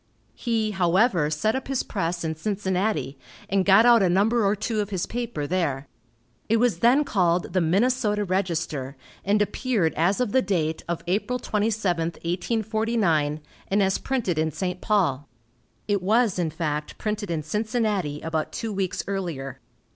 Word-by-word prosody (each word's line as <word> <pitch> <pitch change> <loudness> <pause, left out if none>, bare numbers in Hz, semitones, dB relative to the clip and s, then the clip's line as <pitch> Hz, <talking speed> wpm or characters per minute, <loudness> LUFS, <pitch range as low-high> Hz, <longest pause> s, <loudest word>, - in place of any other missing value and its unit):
He, 225 -3 -1
however, 185 -2 +2
set 155 +10 0
up 265 - -4
his 270 -2 -1
press 170 -4 -2
in 160 -1 -2
Cincinnati, 190 -5 -1 0.3
and 195 0 +2
got 200 +4 +6
out 240 -2 +7
a 185 - +3
number 215 +6 +3
or 200 +1 +2
two 215 +1 -2
of 205 -1 -1
his 190 -4 -2
paper 235 -11 -4
there. 145 -5 -1 0.6
It 225 - +4
was 230 -7 +2
then 250 +7 +5
called 175 - +1
the 185 - +2
"Minnesota 210 +4 +1
Register," 165 -8 -2 0.3
and 205 +2 +2
appeared 210 -6 0
as 175 +7 +1
of 250 -5 0
the 260 - +4
date 160 -6 -1
of 170 - -2
April 210 +8 0
27, 210 -7 0
1849, 180 -4 0 0.3
and 200 +1 +2
as 190 0 +1
printed 225 - -1
in 160 0 +1
St. 180 +3 -4
Paul. 160 - +1 0.6
It 205 -2 +1
was 215 0 +2
in 170 -2 0
fact 150 -1 -3
printed 210 -2 -3
in 160 -2 -2
Cincinnati 210 - -1
about 160 -1 -2
two 225 -2 -4
weeks 190 -2 -2
earlier. 170 -10 -4
195 Hz, 160 wpm, -25 LUFS, 165-220 Hz, 0.6 s, out